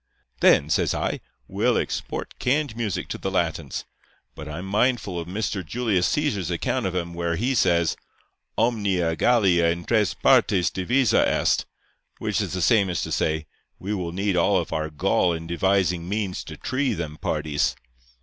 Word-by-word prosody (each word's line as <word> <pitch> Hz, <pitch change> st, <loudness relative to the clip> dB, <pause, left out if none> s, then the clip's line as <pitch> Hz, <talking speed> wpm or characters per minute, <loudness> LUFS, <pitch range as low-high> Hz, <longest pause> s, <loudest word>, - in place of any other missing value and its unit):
"'Then,' 75 Hz, -, +5 dB
says 75 Hz, -, +1 dB
I, -, -, -2 dB, 0.3 s
'we'll -, -, +1 dB
export -, -, -4 dB
canned 140 Hz, -1 st, 0 dB
music 110 Hz, -5 st, -2 dB
to -, -, -4 dB
the -, -, -2 dB
Latins; -, -, -2 dB, 0.5 s
but 75 Hz, -, -9 dB
I'm 85 Hz, +5 st, -6 dB
mindful 105 Hz, -2 st, 0 dB
of 85 Hz, -, -6 dB
Mr. 100 Hz, 0 st, -2 dB
Julius 105 Hz, -1 st, 0 dB
Cæsar's 115 Hz, -, 0 dB
account 85 Hz, +2 st, -1 dB
of 90 Hz, -, -4 dB
'em 85 Hz, -1 st, -2 dB
where 85 Hz, 0 st, -1 dB
he 120 Hz, +9 st, 0 dB
says: 85 Hz, -8 st, +2 dB, 0.6 s
"Omnia 100 Hz, -8 st, +1 dB
Gallia 95 Hz, -7 st, +3 dB
in 85 Hz, 0 st, -2 dB
tres 110 Hz, -4 st, +1 dB
partes 90 Hz, -4 st, +3 dB
divisa 120 Hz, +7 st, +2 dB
est;" -, -, +1 dB, 0.5 s
which -, -, -1 dB
is -, -, -3 dB
the 90 Hz, -2 st, -1 dB
same 100 Hz, 0 st, +4 dB
as 85 Hz, -, -1 dB
to -, -, -5 dB
say, 80 Hz, 0 st, 0 dB, 0.3 s
"We 100 Hz, +3 st, -4 dB
will 90 Hz, -4 st, -3 dB
need 95 Hz, +2 st, -1 dB
all 95 Hz, +3 st, +3 dB
of 85 Hz, -, -2 dB
our 80 Hz, 0 st, -1 dB
gall 80 Hz, +3 st, +1 dB
in 80 Hz, 0 st, -5 dB
devising 90 Hz, 0 st, +1 dB
means 100 Hz, -3 st, -2 dB
to 80 Hz, -, -9 dB
tree 130 Hz, -, -1 dB
them 80 Hz, -3 st, -5 dB
parties." 75 Hz, -2 st, -1 dB
90 Hz, 170 wpm, -24 LUFS, 85-105 Hz, 0.6 s, Then